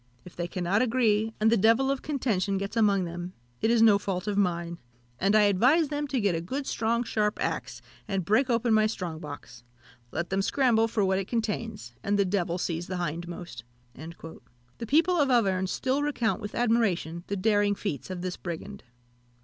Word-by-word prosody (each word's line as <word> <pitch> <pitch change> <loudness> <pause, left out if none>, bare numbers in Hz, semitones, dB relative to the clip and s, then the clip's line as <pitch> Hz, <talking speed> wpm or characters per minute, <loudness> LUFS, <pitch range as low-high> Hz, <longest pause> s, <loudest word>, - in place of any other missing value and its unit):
If 180 - -12
they 175 0 -3
cannot 185 +4 0
agree, 225 -3 +2
and 220 +1 +3
the - - +5
devil 230 +6 +4
of 275 - -2
contention 210 -10 -1
gets 200 +3 -4
among 205 -4 +3
them, 175 +1 -6 0.3
it 220 - +2
is 230 -1 +4
no 210 -3 +6
fault 190 -2 -3
of 210 -1 -1
mine; 170 -3 -1 0.4
and 195 +3 +2
I 215 - +6
advise 255 - +4
them 295 0 -2
to 270 -2 -1
get 200 -4 +1
a 165 - -2
good 270 +12 -4
strong 230 0 0
sharp 210 -3 0
axe, - - -3 0.2
and 195 -3 -2
break 250 +8 +2
open 235 -1 +2
my 215 0 +4
strong 180 -7 -5
box. 145 -5 -10 0.5
Let 170 +8 -4
them 195 0 +1
scramble 225 0 +2
for 220 -3 0
what 190 0 +1
it 195 - -4
contains, 225 - -3
and 205 +1 0
the 200 - +3
devil 180 -2 -1
seize 170 -1 -3
the 185 - -3
hindmost." 170 -5 -5 0.3
The 140 - -11
people 335 - +3
of 285 -4 +3
Auvergne 195 -7 +2
still 260 +8 -1
recount 270 -7 0
with 205 -1 -6
admiration 200 -8 +1
the 200 - -2
daring 205 0 +2
feats 190 - -4
of 180 -1 -5
this 185 -1 -3
brigand. 185 +4 -7
205 Hz, 190 wpm, -27 LUFS, 175-230 Hz, 0.5 s, no